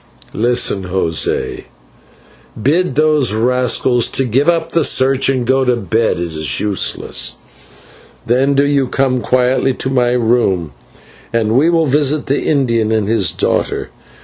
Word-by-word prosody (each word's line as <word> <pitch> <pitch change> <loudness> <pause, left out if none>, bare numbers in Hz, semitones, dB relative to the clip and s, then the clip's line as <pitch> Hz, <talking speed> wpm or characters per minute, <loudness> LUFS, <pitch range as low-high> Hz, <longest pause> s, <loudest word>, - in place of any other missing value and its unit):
"Listen, 115 -4 0
José, 90 -3 -2 0.9
bid 150 +6 0
those 150 -6 +2
rascals 125 +1 +1
to 135 - 0
give 135 +7 +1
up 170 -1 -1
the 165 - +1
search 135 0 +2
and 130 -3 -1
go 130 +2 +2
to 125 -1 +1
bed, 110 0 -1
it - - -4
is 80 -6 -3
useless. 95 -10 -1 0.9
Then 130 +4 +1
do 140 +1 +3
you 140 -2 +1
come 130 -1 0
quietly 130 +2 +1
to 130 - -4
my 125 -2 +1
room, 110 - 0 0.6
and 115 -1 0
we 150 +6 +3
will 165 -1 +2
visit 145 +1 +1
the 140 +1 -1
Indian 115 -7 0
and 110 -2 0
his 105 -6 +1
daughter. - - -2
125 Hz, 145 wpm, -15 LUFS, 110-135 Hz, 0.9 s, do